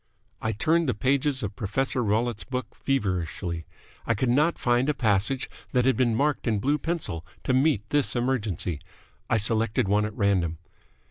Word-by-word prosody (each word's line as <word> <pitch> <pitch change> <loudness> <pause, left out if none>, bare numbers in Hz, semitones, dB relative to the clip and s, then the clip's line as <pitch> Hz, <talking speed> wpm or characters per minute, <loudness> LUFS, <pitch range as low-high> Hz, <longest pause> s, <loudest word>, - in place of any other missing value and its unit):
I 110 - 0
turned 155 +8 +2
the - - 0
pages 135 +3 +1
of 100 -1 -4
Professor 125 +6 -1
Rollitt's 110 +1 0
book 125 -3 -5
feverishly. 90 - -2 0.4
I 115 - +2
could 120 +4 0
not 150 +6 +3
find 120 +3 +2
a 150 - +1
passage 115 +2 +1 0.3
that 125 -1 +3
had 130 - +4
been 120 -3 +2
marked 145 +2 0
in 110 -2 +2
blue 145 +8 +1
pencil 155 - -2 0.2
to 130 - 0
meet 130 -5 +2
this 145 -2 +2
emergency. 110 - -1 0.5
I - - +3
selected 110 +1 +2
one 105 +2 +2
at 105 0 -6
random. 90 -5 +1
120 Hz, 170 wpm, -26 LUFS, 105-135 Hz, 0.5 s, had